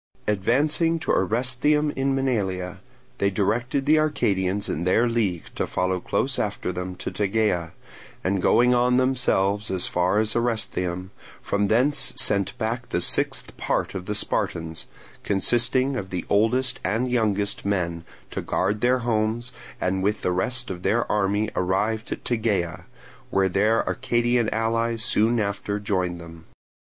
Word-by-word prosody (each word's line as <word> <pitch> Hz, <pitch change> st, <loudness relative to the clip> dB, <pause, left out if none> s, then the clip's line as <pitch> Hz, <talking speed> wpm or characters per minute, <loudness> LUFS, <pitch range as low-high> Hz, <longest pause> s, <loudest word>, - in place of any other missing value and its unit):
Advancing 145 Hz, -, +2 dB
to 160 Hz, -, -2 dB
Orestheum 130 Hz, +8 st, +1 dB
in 135 Hz, 0 st, 0 dB
Maenalia, 95 Hz, -9 st, -1 dB, 0.4 s
they 100 Hz, -, +2 dB
directed 120 Hz, +8 st, 0 dB
the 155 Hz, +2 st, +5 dB
Arcadians 100 Hz, -10 st, 0 dB
in 80 Hz, -, -2 dB
their 110 Hz, +7 st, +3 dB
league 105 Hz, -8 st, 0 dB
to -, -, -2 dB
follow 90 Hz, 0 st, -1 dB
close 130 Hz, +8 st, -1 dB
after 100 Hz, -3 st, -2 dB
them 90 Hz, 0 st, -5 dB
to -, -, -5 dB
Tegea, 100 Hz, -4 st, 0 dB, 0.5 s
and, 95 Hz, 0 st, 0 dB
going 125 Hz, +6 st, +4 dB
on 125 Hz, 0 st, +3 dB
themselves 110 Hz, -6 st, +1 dB
as 95 Hz, -2 st, 0 dB
far 90 Hz, +3 st, +1 dB
as 110 Hz, 0 st, +1 dB
Orestheum, 95 Hz, -6 st, -1 dB, 0.3 s
from 100 Hz, 0 st, 0 dB
thence 130 Hz, +8 st, +2 dB
sent 100 Hz, -2 st, +1 dB
back 120 Hz, +2 st, -3 dB
the -, -, 0 dB
sixth -, -, +2 dB
part -, -, -1 dB
of 95 Hz, -1 st, -6 dB
the 105 Hz, -, -1 dB
Spartans, 80 Hz, -4 st, -1 dB, 0.4 s
consisting 120 Hz, +6 st, +2 dB
of 100 Hz, -6 st, -4 dB
the 90 Hz, -1 st, -4 dB
oldest 125 Hz, +5 st, +2 dB
and 115 Hz, +7 st, 0 dB
youngest 105 Hz, -4 st, 0 dB
men, 85 Hz, -4 st, -1 dB, 0.3 s
to -, -, -3 dB
guard 100 Hz, +3 st, -1 dB
their 125 Hz, +1 st, +2 dB
homes, 115 Hz, +1 st, 0 dB, 0.3 s
and 95 Hz, +1 st, 0 dB
with 105 Hz, +2 st, -1 dB
the 90 Hz, -, +1 dB
rest 120 Hz, +6 st, -1 dB
of 90 Hz, -1 st, -6 dB
their 115 Hz, +5 st, 0 dB
army 105 Hz, +1 st, +1 dB
arrived 105 Hz, +5 st, -1 dB
at -, -, -5 dB
Tegea; 95 Hz, -7 st, -1 dB, 0.4 s
where 95 Hz, -1 st, +2 dB
their 105 Hz, +5 st, +2 dB
Arcadian 120 Hz, -1 st, +1 dB
allies 115 Hz, 0 st, 0 dB
soon 115 Hz, +3 st, +2 dB
after 100 Hz, 0 st, -2 dB
joined 90 Hz, -4 st, -1 dB
them. 85 Hz, -1 st, -12 dB
105 Hz, 145 wpm, -24 LUFS, 95-120 Hz, 0.5 s, the